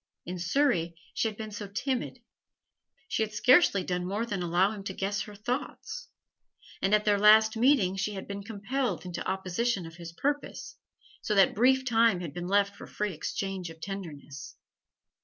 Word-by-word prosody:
In 180 +1 -5
Surrey 170 - +1 0.2
she - - +1
had 215 -1 -5
been 215 -1 -6
so 205 0 -6
timid; 250 +3 -3 0.8
she - - -1
had 215 -1 0
scarcely 230 - +5
done 180 0 -2
more 205 +5 -1
than 205 -5 -3
allow 175 +3 +2
him 205 -2 -7
to 190 - -4
guess 205 +2 -1
her 210 0 -7
thoughts; 255 - -4 0.7
and 195 +2 +4
at 210 - 0
their 205 -1 +3
last 220 +1 +6
meeting 225 -6 +3
she 200 +2 -1
had 190 - -6
been 200 0 -5
compelled 220 0 -3
into 175 -1 -4
opposition 190 +2 -1
of 165 0 -11
his 170 -1 -8
purpose, 285 +12 -3 0.5
so 210 - -1
that 195 -2 +5
brief 260 +3 +3
time 230 -5 +4
had 170 -5 -6
been 175 +1 -5
left 200 +1 +2
for - - -10
free 210 -2 -3
exchange 190 +2 -4
of 165 0 -12
tenderness. 155 -8 -7
200 Hz, 175 wpm, -29 LUFS, 180-225 Hz, 0.8 s, last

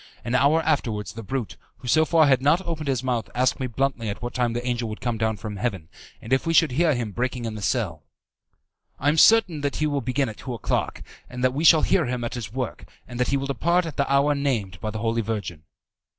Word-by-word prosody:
An 120 - -2
hour 140 +5 +3
afterwards 110 - -1
the 115 - -7
brute, 120 +1 -4 0.2
who 125 - -11
so 160 +5 +4
far 160 -1 +4
had 135 -3 +3
not 145 +6 +4
opened 160 -3 -4
his 130 -2 0
mouth, 125 -3 -1
asked 125 +1 +1
me 130 - -2
bluntly 125 -2 -1
at 100 - -5
what 120 0 -5
time 120 -2 0
the 120 +1 -4
angel 120 -2 -1
would 110 - -6
come 120 -2 -2
down 110 -1 0
from 105 0 -6
heaven, 95 -8 -3 0.3
and 115 - -2
if 130 - +1
we 165 - +1
should 160 -3 +5
hear 155 +2 +2
him 115 -4 -3
breaking 125 +2 -3
in 110 - -3
the 105 - -7
cell. 100 - -1 1.0
"I 145 - +2
am 155 - +1
certain 195 -9 +5
that 145 0 -2
he 155 - 0
will 145 -2 0
begin 130 +1 0
at 110 - -7
two 125 -2 -6
o'clock, 110 - -2 0.3
that 125 +1 0
we 150 +4 -2
shall 160 -1 +7
hear 170 -8 +2
him 125 -1 -3
at 120 - -3
his 115 -7 -6
work, 125 -1 -4 0.2
and 120 0 -8
that 125 - +2
he 140 - +1
will 135 - -3
depart 170 +7 +1
at 160 -4 -7
the 140 -1 0
hour 140 +1 +4
named 120 -10 -2
by 110 - -2
the 110 - -5
Holy 115 +1 0
Virgin." 100 -8 -5
125 Hz, 250 wpm, -24 LUFS, 115-140 Hz, 1.0 s, shall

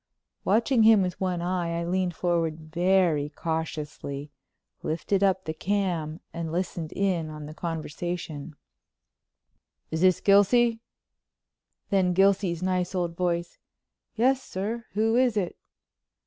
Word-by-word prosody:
Watching 230 +4 +3
him 220 -2 +7
with 180 0 -4
one 180 -2 -1
eye 175 -2 -1
I - - -2
leaned 180 0 0
forward 165 -3 0
very 175 -4 +3
cautiously, 150 -3 -4 0.5
lifted 170 +5 -1
up 190 -1 +2
the 155 - -2
cam 175 -3 -1
and 165 -1 -4
listened 170 -2 -3
in 180 -5 0
on 150 -1 -7
the 150 - -8
conversation: 165 -1 -5 1.4
"Is 160 0 -2
this 185 -1 +5
Gilsey?" 225 +4 +4 1.1
Then 185 -2 +3
Gilsey's 190 -2 +3
nice 185 0 0
old 175 -2 -1
voice, 170 -1 -2 0.6
"Yes, 260 +4 +3
sir. 220 +2 -4
Who 220 +2 +2
is 250 -4 +3
it?" 185 -4 -1
180 Hz, 120 wpm, -27 LUFS, 165-195 Hz, 1.4 s, him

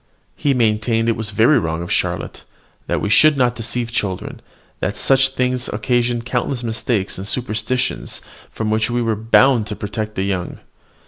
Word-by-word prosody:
He 140 -2 +1
maintained 115 0 +1
it 115 - +2
was 110 -1 -2
very 110 +7 +4
wrong 80 +1 -2
of 85 - -7
Charlotte, - - -2 0.4
that - - -1
we 105 - -1
should 150 +7 +6
not 125 -2 +3
deceive 120 0 -4
children, 95 -5 -3 0.4
that 100 - -2
such 135 0 +4
things 125 -1 -1
occasioned 120 +1 0
countless 125 0 -2
mistakes 110 -4 -2
and 95 - -5
superstitions, 125 +1 -2 0.3
from 110 -1 -3
which 110 +1 +1
we 120 0 0
were 115 -1 0
bound 115 +1 +4
to 105 - -4
protect 105 +1 -4
the 95 - -1
young. 95 -2 -3
115 Hz, 170 wpm, -19 LUFS, 105-125 Hz, 0.4 s, should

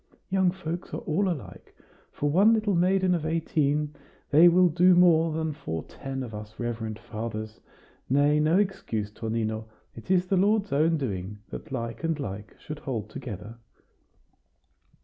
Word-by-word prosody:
Young 190 -1 +3
folks 175 -1 -5
are - - -4
all 185 +5 0
alike; 160 -8 -7 0.4
for 145 0 -1
one 200 +8 +5
little 215 -2 0
maiden 185 +1 +3
of 170 -3 -1
eighteen 150 -2 0 0.4
they 160 +4 +8
will 180 +1 +6
do 180 +2 +5
more 165 -2 +5
than 160 0 -2
for 80 - -5
ten 135 -1 -6
of 115 -3 -8
us 105 +1 -9
reverend 115 -2 -3
fathers. 110 -1 -6 0.5
Nay, 145 +3 +4
no 155 +4 +3
excuse, 115 - -1
Tonino. 110 0 -3 0.3
It 115 - -12
is 185 -1 +3
the 190 +1 +1
Lord's 205 +2 +2
own 160 +3 +3
doing, 105 -7 -4
that 155 - -8
like 115 +1 -4
and 165 -2 0
like 105 -4 -7
should 150 -1 -7
hold 110 -5 -4
together." 110 0 -7
150 Hz, 155 wpm, -27 LUFS, 115-175 Hz, 0.5 s, they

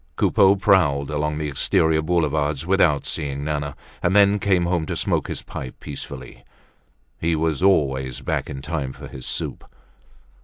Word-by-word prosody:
Coupeau 100 +8 +4
prowled 75 -9 +2
along 75 0 -1
the 75 -1 -2
exterior 80 +2 +2
Boulevards 75 -3 0
without 85 -6 +3
seeing 70 -1 -3
Nana 75 -1 -3 0.3
and 90 +3 +1
then 100 0 +5
came 95 -3 +2
home 85 -3 0
to - - -3
smoke - - 0
his - - -5
pipe 65 -2 -8
peacefully. 65 -3 -8 0.8
He 80 0 +1
was 80 -1 0
always 65 -9 +1
back - - -2
in 70 0 -7
time 75 -4 -3
for - - -10
his 65 -1 -7
soup. - - -3
75 Hz, 155 wpm, -22 LUFS, 70-90 Hz, 0.8 s, then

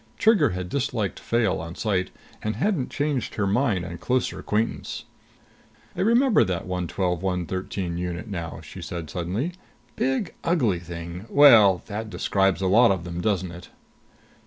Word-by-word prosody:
Trigger 205 - +4
had 90 -2 -4
disliked 120 -3 -2
Fayle 115 -8 0
on 85 +1 -7
sight, 95 -4 0 0.3
and 110 0 -2
hadn't 155 - 0
changed 145 -3 -2
her 105 - 0
mind 100 -3 +1
on 85 -2 -7
closer 125 +9 -1
acquaintance. 110 +2 -2 0.9
"I - - -2
remember 235 +4 +4
that 90 -2 -2
112 90 -1 -2
113 90 -1 -2
unit 90 +3 -4
now," 85 -6 -5
she - - -10
said 85 -3 -6
suddenly. 95 - -2 0.4
"Big, 135 +7 -1
ugly 125 - +2
thing 85 +3 -8
well, 115 -10 +7
that 110 +2 -5
describes 95 -3 +1
a - - 0
lot 115 +5 +6
of 95 -3 0
them, 85 0 -5
doesn't 95 -3 0
it?" 85 0 -11
95 Hz, 150 wpm, -25 LUFS, 90-125 Hz, 0.9 s, well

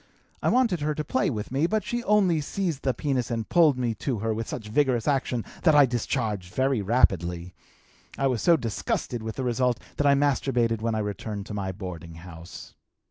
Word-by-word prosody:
I - - +2
wanted 235 -9 +2
her 150 +1 -1
to 150 - -2
play 210 +1 0
with 110 -5 -4
me, 140 +5 +2
but 215 +1 0
she 240 +4 -3
only 190 -6 +3
seized 165 -2 -2
the 135 - +1
penis 130 -1 -1
and 115 -2 -2
pulled 160 -6 +4
me 120 -2 0
to 130 -5 -1
her 110 +2 -1
with 115 +1 -4
such 110 -4 -5
vigorous 125 0 +1
action 130 -4 0 0.2
that 160 -3 +4
I 145 -1 +8
discharged 110 -6 -2
very 130 -3 +1
rapidly. 90 -5 +1 0.6
I 135 - 0
was 125 -4 +1
so 170 -2 +5
disgusted 115 0 -3
with 110 -1 -5
the 130 - -3
result 125 0 +1 0.2
that 145 - +2
I 140 - +6
masturbated 125 -5 +1
when 115 0 0
I - - 0
returned 105 0 -5
to 105 - -7
my 100 -2 -2
boarding 90 -4 -8
house. 85 0 -11
125 Hz, 200 wpm, -26 LUFS, 105-145 Hz, 0.6 s, I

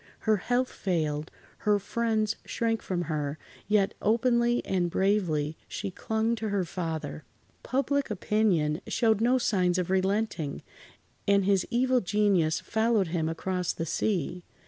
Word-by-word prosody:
Her 215 -1 +3
health 245 +5 0
failed, 155 -4 -1 0.3
her 210 -1 +3
friends 220 +1 0
shrank 225 -1 -1
from 175 -2 -2
her, 150 -3 -2 0.3
yet 205 -2 +2
openly 235 +2 +2
and 180 -2 0
bravely 170 -6 +1
she 200 -2 -4
clung 220 +4 -1
to 220 0 -3
her 200 -2 +1
father. 160 - -4 0.4
Public 280 +2 0
opinion 190 -6 +1
showed 220 -3 +2
no 245 +3 +4
signs 185 -7 +1
of 180 0 -1
relenting, 190 -5 0 0.6
and 200 -1 +4
his 195 -2 +2
evil 255 +1 +2
genius 190 -5 +2
followed 220 -4 +1
him 160 -2 0
across 180 +2 -2
the 165 - -3
sea. 180 0 -1
200 Hz, 135 wpm, -28 LUFS, 175-220 Hz, 0.6 s, no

